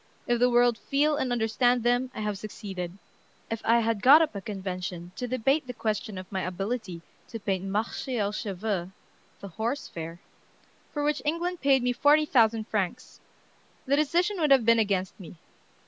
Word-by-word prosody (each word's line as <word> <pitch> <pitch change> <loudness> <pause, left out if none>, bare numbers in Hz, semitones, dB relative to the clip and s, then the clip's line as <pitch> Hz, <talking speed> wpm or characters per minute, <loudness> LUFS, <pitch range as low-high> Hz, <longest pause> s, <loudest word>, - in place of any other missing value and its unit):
If 240 -3 +1
the 245 +1 +4
world 240 -1 +3
feel 295 +2 +1
and 260 -4 -1
understand 245 +1 +2
them, 245 +2 +2
I - - -4
have 210 -2 -2
succeeded.... 190 -4 -6 0.5
If 225 - -3
I 235 +1 +4
had 225 -2 -1
got 275 +7 +8
up 310 - -3
a 200 - -5
convention 185 -3 -5
to 250 - -4
debate 255 +4 +1
the 250 - -6
question 215 -2 -3
of 185 0 -9
my 190 -1 -2
ability 185 -1 -4 0.2
to 225 - -7
paint 195 -2 -2
'Marché 220 +5 -2
au 205 -1 0
Chevaux' 195 -3 -3 0.5
[The 200 - -7
Horse 225 - -3
Fair], 165 +1 -7 0.7
for 295 - -3
which 295 0 0
England 340 +4 -2
paid 270 -2 +3
me 250 0 +1
forty 295 +4 +4
thousand 225 -5 +2
francs, 210 +3 -3 0.7
the 275 +1 +2
decision 350 +7 +1
would 305 -2 +2
have 265 -4 +5
been 230 0 +5
against 195 -3 -1
me. 180 -2 -10
225 Hz, 180 wpm, -27 LUFS, 195-260 Hz, 0.7 s, got